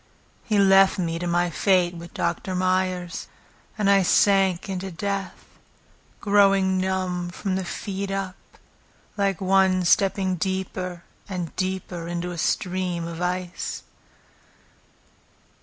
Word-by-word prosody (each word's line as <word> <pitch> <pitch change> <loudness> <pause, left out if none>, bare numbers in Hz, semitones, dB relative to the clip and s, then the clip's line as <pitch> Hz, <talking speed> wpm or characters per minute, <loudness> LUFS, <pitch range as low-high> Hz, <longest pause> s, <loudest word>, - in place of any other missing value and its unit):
He 215 - 0
left 195 0 +5
me 165 -2 -2
to 175 - -3
my 175 0 +1
fate 180 0 +2
with 170 0 -10
Doctor 185 - -2
Meyers; 185 -1 -1 0.5
And 210 -2 +1
I 200 -1 +5
sank 190 -1 +3
into 190 0 -4
death, 195 +1 -4 0.7
growing 195 -2 +3
numb 185 -2 -1
from 185 +2 -3
the 190 - -1
feet 195 +2 -4
up, 195 -1 -3 0.8
Like 195 -3 0
one 190 -1 +3
stepping 190 0 +2
deeper 185 -1 -3 0.3
and 180 -4 -4
deeper 185 -2 -3
into 175 +1 -3
a 170 - -6
stream 180 -1 -1
of 170 0 -6
ice. 180 0 -3
185 Hz, 120 wpm, -24 LUFS, 175-195 Hz, 0.8 s, left